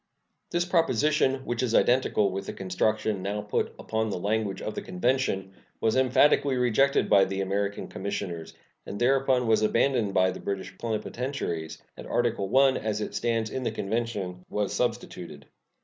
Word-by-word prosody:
This 175 0 0
proposition, 150 -5 +2
which 120 0 -2
is 120 -3 0
identical 120 -5 +3
with 95 +1 -5
the - - -4
construction 105 +2 -1
now 100 +2 -2
put 105 0 -1
upon 110 0 -2
the 100 - -2
language 105 +1 -1
of 110 - -4
the - - -4
convention, 95 -1 -1 0.3
was 110 - +1
emphatically 130 +1 +4
rejected 125 +3 +3
by 100 -1 +6
the 95 0 -2
American 100 +1 -2
commissioners, 95 -4 -5 0.3
and - - -5
thereupon 130 0 +3
was 110 -1 +3
abandoned 110 -2 +1
by 95 0 +4
the - - -8
British 95 -1 -4
plenipotentiaries, 110 - -4
and - - -10
Article 115 -2 0
I, 135 0 +6
as 110 -1 -2
it 105 - -4
stands 115 -2 -1
in 130 - -3
the 125 - 0
convention, 105 -4 -3
was 105 -1 -1
substituted. 90 - -3
110 Hz, 160 wpm, -27 LUFS, 95-125 Hz, 0.3 s, by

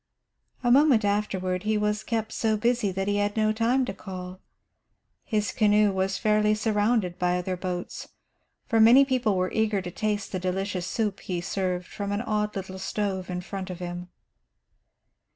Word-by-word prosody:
A 240 - +3
moment 265 -5 +5
afterward 190 -3 -1
he 215 +1 0
was 210 0 0
kept 220 -2 -2
so 220 -1 0
busy 235 -2 +1
that 195 +1 -3
he 205 0 +1
had 205 +1 -1
no 215 0 +2
time 240 +4 +2
to - - -4
call. 185 -1 -8 0.8
His 210 -3 -1
canoe 210 -1 +3
was 190 0 -1
fairly 215 -1 +2
surrounded 210 -3 0
by 180 0 +1
other 185 +1 -2
boats, 180 -1 -5 0.6
for 225 - +1
many 240 +5 +8
people 250 -7 +1
were 185 0 0
eager 220 -2 +1
to 180 -2 -6
taste 210 +1 -2
the 185 - -2
delicious 185 0 -2
soup 210 -4 -1
he 180 -2 -3
served 180 0 -2
from 200 +3 -5
an 205 +1 -1
odd 210 -3 -1
little 190 -1 -6
stove 195 -2 -2
in 180 0 -3
front 190 +1 -6
of 180 - -5
him. 175 0 -6
205 Hz, 170 wpm, -26 LUFS, 185-215 Hz, 0.8 s, many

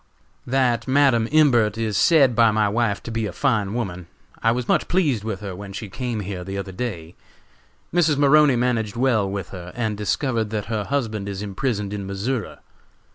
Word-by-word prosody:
"That 125 -2 +1
Madam 130 -4 +3
Imbert 120 -9 +4
is 110 -2 -2
said 140 - +4
by 115 -1 +5
my 105 -1 +2
wife 105 -1 0
to 115 - -6
be 115 -1 -1
a - - -5
fine 105 -3 0
woman. 90 -7 -4 0.3
I 115 - +3
was 125 0 -2
much - - +2
pleased 150 - +1
with 110 -3 -4
her 100 -3 -6
when 100 +1 -9
she 105 +1 -6
came 120 -1 -3
here 95 -2 -5
the 95 +2 -5
other 100 -1 -5
day. 90 -6 -5 0.8
Mrs. 165 -4 +3
Maroney 145 -1 +5
managed 120 -3 0
well 115 -5 +1
with 100 -2 -5
her 90 -2 -8
and 110 -3 -1
discovered 110 +2 -1
that 105 -1 -3
her 105 -2 -1
husband 110 -8 -2
is 100 0 -5
imprisoned 105 0 -2
in 100 -2 -5
Missouri. 105 +4 -3
110 Hz, 185 wpm, -22 LUFS, 100-125 Hz, 0.8 s, by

